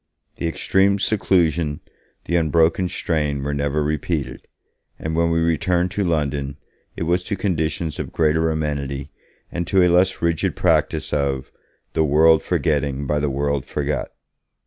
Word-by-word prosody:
The 85 - -2
extreme 95 +4 +2
seclusion, 85 -7 +1 0.5
the 85 - -1
unbroken 85 +2 +2
strain, 75 -6 -1
were 75 +1 -2
never 70 +1 0
repeated, 75 -3 -3 0.5
and 80 0 -4
when 85 0 +2
we 80 0 +1
returned 85 +2 +1
to 100 +2 -1
London, 70 -4 -1 0.4
it - - -3
was 90 +2 +1
to 100 - -2
conditions 80 -4 -2
of - - -4
greater 80 0 +2
amenity 70 -3 -3 0.4
and 85 -1 -3
to 95 -1 +4
a 90 - +4
less 95 +2 +3
rigid 85 -2 0
practice - - +1
of 70 -2 -1 0.4
'the 80 - +2
world 80 +2 +5
forgetting 70 -2 0
by 75 +2 0
the 75 0 0
world 70 0 -1
forgot'. 75 +2 -3
80 Hz, 145 wpm, -21 LUFS, 70-85 Hz, 0.5 s, world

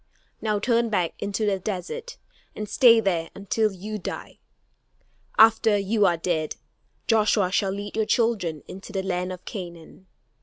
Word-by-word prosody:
Now 215 -2 0
turn 235 +2 +1
back 180 -6 0
into 200 +2 -2
the 200 -2 +1
desert 215 - -5 0.4
and 210 - -5
stay 230 +2 +6
there 175 -6 0
until 210 +2 0
you 210 +3 -6
die. 175 - -7 1.0
After 220 -1 +6
you 200 +1 +2
are 175 - +2
dead, 160 -2 -1 0.5
Joshua 215 -4 +3
shall 195 0 +1
lead 200 +1 -5
your 220 -1 0
children 210 - 0
into 195 +2 -9
the 195 -2 -2
land 180 -1 -2
of 180 -1 -9
Canaan. 175 -1 -9
200 Hz, 150 wpm, -25 LUFS, 185-220 Hz, 1.0 s, stay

